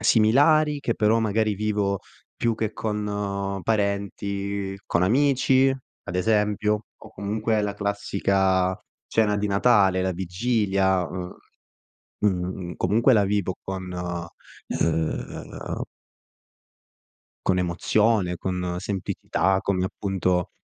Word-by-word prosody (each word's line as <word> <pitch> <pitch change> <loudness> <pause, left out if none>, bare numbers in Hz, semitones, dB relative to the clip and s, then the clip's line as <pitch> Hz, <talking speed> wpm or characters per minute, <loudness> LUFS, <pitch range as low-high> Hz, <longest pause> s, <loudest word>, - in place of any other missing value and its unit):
similari 145 +8 +4
che 115 - -1
però 110 +1 +3
magari 110 -1 +1
vivo 100 -1 0 0.4
più 115 -1 +1
che 110 -1 -2
con 100 -2 -2
parenti, 100 -1 -1
con 85 - +1
amici, 135 +4 +4 0.4
ad 90 - -4
esempio, 105 +1 +1
o - - -14
comunque 110 +2 -1
la 100 -1 -2
classica 95 -2 +1 0.3
cena 105 -2 +2
di 105 +1 0
Natale, 100 -2 +4
la 95 0 0
vigilia, 95 0 +1
ehm, 90 0 -6 0.9
uhm, 90 -2 -1
comunque 115 +8 +3
la 105 -3 +4
vivo 100 -2 0
con 95 -1 -5
uhm 85 -2 -4 1.6
Con 90 - +3
emozione, 90 +2 +1
con 90 -1 -3
semplicità, 95 0 -1
come 95 -2 0
appunto 90 -2 -1
100 Hz, 100 wpm, -25 LUFS, 95-110 Hz, 1.6 s, similari